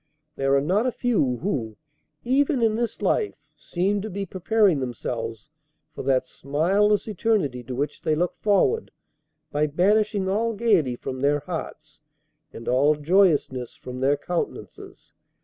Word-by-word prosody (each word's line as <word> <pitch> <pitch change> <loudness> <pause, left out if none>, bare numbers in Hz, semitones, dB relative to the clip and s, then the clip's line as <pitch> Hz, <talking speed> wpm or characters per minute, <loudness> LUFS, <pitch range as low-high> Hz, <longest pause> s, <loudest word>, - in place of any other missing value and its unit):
There 135 0 +2
are 140 - +3
not 195 - +1
a - - +1
few 210 - 0
who, 115 - -2 0.5
even 270 0 +2
in 220 -1 +3
this 235 0 -3
life, 420 - +1 0.2
seem 195 +3 -1
to 215 - -5
be 200 0 -4
preparing 190 -2 +2
themselves 120 0 -5 0.4
for - - -6
that 130 -1 +2
smileless 190 - +1
eternity 200 - 0
to 125 - -5
which 145 +4 -3
they 155 - +1
look 175 +3 -1
forward, 400 - +2 0.6
by 150 +1 +1
banishing 200 +5 +2
all 225 +4 0
gaiety 195 - +2
from 130 +1 -6
their 145 +2 +2
hearts - - -7 0.5
and 115 - -10
all 140 +5 +3
joyousness 150 -6 +2
from 125 0 -8
their 140 +2 +2
countenances. 170 +4 -6
175 Hz, 145 wpm, -24 LUFS, 135-210 Hz, 0.6 s, are